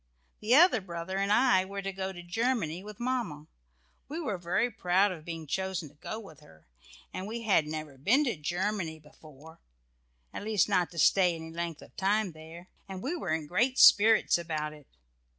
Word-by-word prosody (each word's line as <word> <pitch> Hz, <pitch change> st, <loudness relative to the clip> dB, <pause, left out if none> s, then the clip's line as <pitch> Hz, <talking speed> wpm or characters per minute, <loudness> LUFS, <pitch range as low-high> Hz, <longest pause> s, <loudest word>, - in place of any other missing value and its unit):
The 220 Hz, +4 st, +3 dB
other 315 Hz, -, +6 dB
brother 180 Hz, +1 st, -5 dB
and 200 Hz, +1 st, 0 dB
I 210 Hz, -4 st, +4 dB
were 200 Hz, +1 st, -6 dB
to 195 Hz, -, -3 dB
go 190 Hz, 0 st, -4 dB
to 175 Hz, -2 st, -10 dB
Germany 190 Hz, -3 st, -1 dB
with 210 Hz, -1 st, -10 dB
Mamma. 240 Hz, -12 st, -3 dB, 0.6 s
We 310 Hz, +4 st, -4 dB
were 215 Hz, -, -3 dB
very 185 Hz, +8 st, 0 dB
proud 185 Hz, +2 st, +2 dB
of 165 Hz, -4 st, -8 dB
being 165 Hz, -2 st, -6 dB
chosen 190 Hz, 0 st, -3 dB
to -, -, -23 dB
go 215 Hz, +8 st, -7 dB
with 160 Hz, -10 st, -13 dB
her, 80 Hz, -1 st, -20 dB, 0.5 s
and 185 Hz, -, -5 dB
we 230 Hz, +2 st, -5 dB
had 190 Hz, -8 st, +3 dB
never 155 Hz, -3 st, -6 dB
been 250 Hz, -, +3 dB
to 245 Hz, -8 st, -1 dB
Germany 175 Hz, +2 st, -2 dB
before, 155 Hz, +1 st, -16 dB, 0.7 s
at -, -, -6 dB
least 215 Hz, -1 st, +2 dB
not 185 Hz, -4 st, +1 dB
to 170 Hz, -, -13 dB
stay 180 Hz, 0 st, +4 dB
any 160 Hz, 0 st, -8 dB
length 170 Hz, -1 st, -5 dB
of -, -, -18 dB
time 200 Hz, 0 st, +1 dB
there, 160 Hz, +3 st, -12 dB, 0.2 s
and 190 Hz, -1 st, -7 dB
we 300 Hz, +7 st, -2 dB
were 250 Hz, -, -5 dB
in 160 Hz, -1 st, -1 dB
great 245 Hz, -, 0 dB
spirits 215 Hz, -3 st, +6 dB
about 155 Hz, -3 st, -3 dB
it. 150 Hz, -2 st, -16 dB
185 Hz, 190 wpm, -29 LUFS, 160-210 Hz, 0.7 s, other